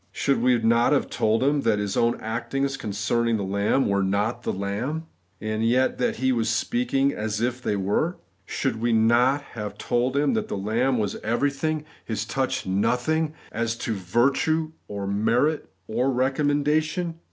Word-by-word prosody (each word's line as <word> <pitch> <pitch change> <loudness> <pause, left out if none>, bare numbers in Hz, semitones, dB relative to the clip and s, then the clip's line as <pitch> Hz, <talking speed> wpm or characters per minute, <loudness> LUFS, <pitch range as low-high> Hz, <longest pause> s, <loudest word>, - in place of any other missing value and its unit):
Should 140 - 0
we 125 -1 +4
not 115 +3 +3
have 145 - 0
told 110 +3 +1
him 145 +1 +2
that 115 -4 +2
his 105 -1 -2
own 115 0 +2
actings 120 +5 -2
concern 110 0 -1
ing 115 -1 +2
the 100 - -3
lamb 100 +7 +1
were 100 0 +1
not 105 +5 0
the - - -2
lamb, 110 +12 -3 0.3
and 110 +1 -2
yet 125 +3 +2
that 125 - +1
he 130 +2 +1
was 115 -2 +1
speaking 140 - +1
as 105 0 -3
if 125 +2 -1
they 105 - 0
were? 100 - 0 0.3
Should 110 - -2
we 120 0 +2
not 120 +5 +3
have 105 -3 -6
told 125 +3 0
him 145 0 +2
that 220 -1 -1
the - - -3
lamb 115 +6 +1
was 105 -2 -1
everything, 145 +6 -1 0.2
his 110 -1 -3
touch 130 +3 -1
nothing, 125 +11 0 0.2
as 115 0 -1
to 115 - -3
virtue 135 - +1 0.2
or 100 -1 -5
merit 115 +10 +1 0.2
or 125 +4 0
recommendation 150 +5 0
120 Hz, 170 wpm, -25 LUFS, 110-140 Hz, 0.3 s, we